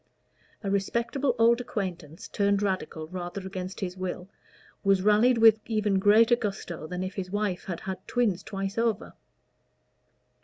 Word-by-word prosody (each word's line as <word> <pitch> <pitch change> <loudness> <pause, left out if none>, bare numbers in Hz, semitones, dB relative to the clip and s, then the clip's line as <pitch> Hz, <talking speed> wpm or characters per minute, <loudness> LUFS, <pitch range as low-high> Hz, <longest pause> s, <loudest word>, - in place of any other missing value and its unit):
A 195 - -1
respectable 235 +6 0
old 235 +1 +4
acquaintance 180 -9 -5
turned 200 0 +1
Radical 180 -5 -2
rather 185 +1 -6
against 190 0 -6
his 180 -2 -3
will, 185 -1 -5 0.6
was 195 -2 +3
rallied 215 +4 +4
with 225 -1 +7
even 210 -3 +1
greater 225 +4 +5
gusto 195 -8 -5
than 180 +2 -4
if 185 +1 -4
his 190 -2 -5
wife 205 -2 -2
had 175 -3 -5
had 190 -1 -6
twins 215 -7 +1
twice 195 +2 -4
over. 230 -3 -1
195 Hz, 145 wpm, -27 LUFS, 185-220 Hz, 0.6 s, with